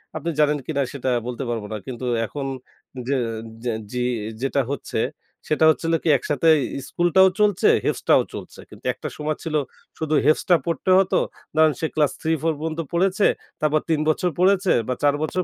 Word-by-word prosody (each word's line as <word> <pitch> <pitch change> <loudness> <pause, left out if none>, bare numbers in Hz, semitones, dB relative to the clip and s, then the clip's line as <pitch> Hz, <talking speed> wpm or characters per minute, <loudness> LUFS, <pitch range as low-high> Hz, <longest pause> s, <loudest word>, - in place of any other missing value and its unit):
আপনি 160 +2 -3
জানেন 150 0 +3
কিনা 140 -3 0
সেটা 130 -2 -2 0.2
বলতে 125 +2 -4
পারব 115 -2 -2
না। 110 - -3
কিন্তু 125 0 -5 0.2
এখন 140 +4 -5 0.6
যে 140 - +1 0.5
যে 120 - 0 0.2
জি 125 0 -2 0.4
যেটা 135 +1 +1
হচ্ছে 140 - -3 0.5
সেটা 155 +1 +3
হচ্ছিল 165 +1 -2
কি - - +1
একসাথে 145 +4 -1 0.4
স্কুলটাও 175 +2 +4
চলছে 205 -3 +3 0.2
হেফজ - - 0
টাও - - +7
চলছে। - - -9
কিন্তু - - -15
একটা - - -7
সময় 150 0 -2
ছিল 160 -2 -3 0.4
শুধু 155 -1 -1
হেফজ 155 - +4
টা 175 - +7
পড়তে 170 +1 -2
হতো। 190 -1 +2 0.4
ধরেন 155 -1 +5
সে 160 - 0
ক্লাস 150 -3 +3
3-4 160 0 0
পর্যন্ত 160 +1 -4
পড়েছে, 190 +3 +2 0.4
তারপর 155 0 +2
৩ 160 -2 +2
বছর 180 +3 +1
পড়েছে 190 +1 +4
বা 125 - 0
৪ 145 -1 +4
বছর 185 +4 -1
155 Hz, 175 wpm, -23 LUFS, 140-170 Hz, 0.6 s, টাও